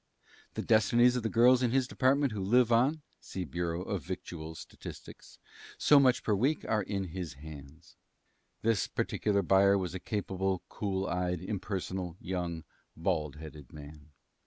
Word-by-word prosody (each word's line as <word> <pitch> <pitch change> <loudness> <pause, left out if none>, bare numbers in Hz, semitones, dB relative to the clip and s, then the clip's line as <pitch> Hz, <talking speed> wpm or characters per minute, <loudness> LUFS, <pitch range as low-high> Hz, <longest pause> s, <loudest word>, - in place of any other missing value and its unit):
The - - -2
destinies 120 +3 +4
of 125 - 0
the 110 - -1
girls 125 +3 +5
in 125 - +2
his 130 +1 +1
department 135 +1 +2
who 105 -2 -4
live 120 +4 +4
on 135 +7 +3 0.2
(see 95 -2 -6
Bureau 85 +3 -3
of 95 -2 -3
Victual 80 -2 -7
Statistics) - - -11 0.4
so 145 - +6
much 130 -3 +3
per 105 - +1
week 135 +10 +1
are 110 -1 +1
in 95 -1 -3
his 85 -2 -5
hands. 70 -1 -12 0.7
This 115 -3 +2
particular 100 -2 0
buyer 100 +2 +5
was 90 -2 -3
a 95 - -4
capable, 95 -2 -2
cool 95 -2 -2
eyed, 90 -1 -1
impersonal, 95 -2 -4
young, 85 -3 -4 0.3
bald 80 -3 -1
headed 75 -3 -11
man. 75 0 -12
95 Hz, 155 wpm, -31 LUFS, 85-115 Hz, 0.7 s, so